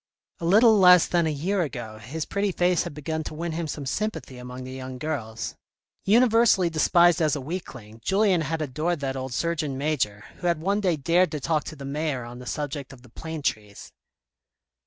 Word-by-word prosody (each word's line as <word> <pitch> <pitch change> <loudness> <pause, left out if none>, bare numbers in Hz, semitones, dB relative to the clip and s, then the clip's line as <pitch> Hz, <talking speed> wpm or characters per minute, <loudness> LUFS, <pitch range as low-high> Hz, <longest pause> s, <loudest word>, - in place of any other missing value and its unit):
A 170 - -4
little 215 +4 +6
less 180 -2 +8
than 170 -2 +1
a - - 0
year 180 +7 -1
ago 120 -8 -5
his 145 +9 -5
pretty 200 0 -1
face 180 -1 +2
had - - -7
begun 160 +2 -3
to - - -6
win 170 +2 -3
him 165 0 -3
some 145 -1 -5
sympathy 160 - -3
among 125 +1 -8
the 130 - -8
young 130 -1 -7
girls. 125 -7 -4 0.5
Univer 230 +2 +5
sally 180 -5 +3
despised 170 +2 +4
as 155 -1 +2
a - - -3
weakling, 130 - -7
Julien 195 -3 +3
had 160 +1 -2
adored 155 +5 -2
that 135 -1 -2
old 130 0 -4
Surgeon 150 0 -1
Major, 130 -8 -1
who 175 - -3
had 170 -2 +1
one 200 +5 0
day 180 -4 +2
dared 170 +6 +2
to 150 - -2
talk 155 +1 0
to 155 - -7
the 140 -2 -9
mayor 145 -2 -2
on 120 +1 -9
the 125 - -10
subject 145 -2 -4
of 125 -2 -14
the 125 - -16
plane 160 +4 -7
trees. 105 -5 -4
155 Hz, 205 wpm, -25 LUFS, 130-175 Hz, 0.5 s, less